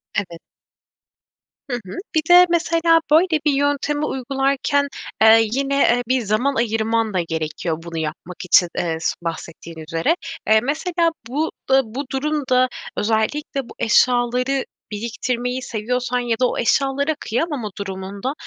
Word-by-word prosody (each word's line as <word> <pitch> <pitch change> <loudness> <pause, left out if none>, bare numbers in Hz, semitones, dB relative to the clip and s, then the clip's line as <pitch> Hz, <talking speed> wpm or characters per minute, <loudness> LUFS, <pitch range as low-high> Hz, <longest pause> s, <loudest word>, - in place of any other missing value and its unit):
Evet. 175 -4 -3 1.3
Hı 245 - -1
hı. 185 - -8 0.2
Bir 315 - +4
de, 360 0 +9
mesela 330 -1 +3
böyle 320 0 +4
bir 300 - +4
yöntemi 285 +1 0
uygularken, 275 +2 0 0.3
eee, 220 0 +6
yine, 275 +3 0
eee, 245 -2 +3
bir 255 0 +2
zaman 230 +6 0
ayırman 225 -1 0
da 185 - +1
gerekiyor 160 0 -3
bunu 170 -1 -7
yapmak 160 +3 -5
için, 180 0 +5
eee, 165 -2 -1
s - - 0
bahsettiğin 165 0 -6
üzere. 165 - 0 0.3
Eee, 220 0 +6
mesela 330 +4 0 0.2
bu, 295 +6 -1 0.2
eee, 265 - +7
bu 255 +5 -6
durum 295 +2 -1
da 255 0 +4 0.3
özellikle 230 +7 0
bu - - -10
eşyaları 250 +3 +2 0.3
biriktirmeyi 245 +3 -3
seviyorsan 250 +2 -2
ya 240 -2 0
da 250 - +5
o - - -4
eşyalara 275 +5 +1
kıyamama 245 -2 -2
durumunda, 195 +5 -5
245 Hz, 140 wpm, -21 LUFS, 210-280 Hz, 1.3 s, de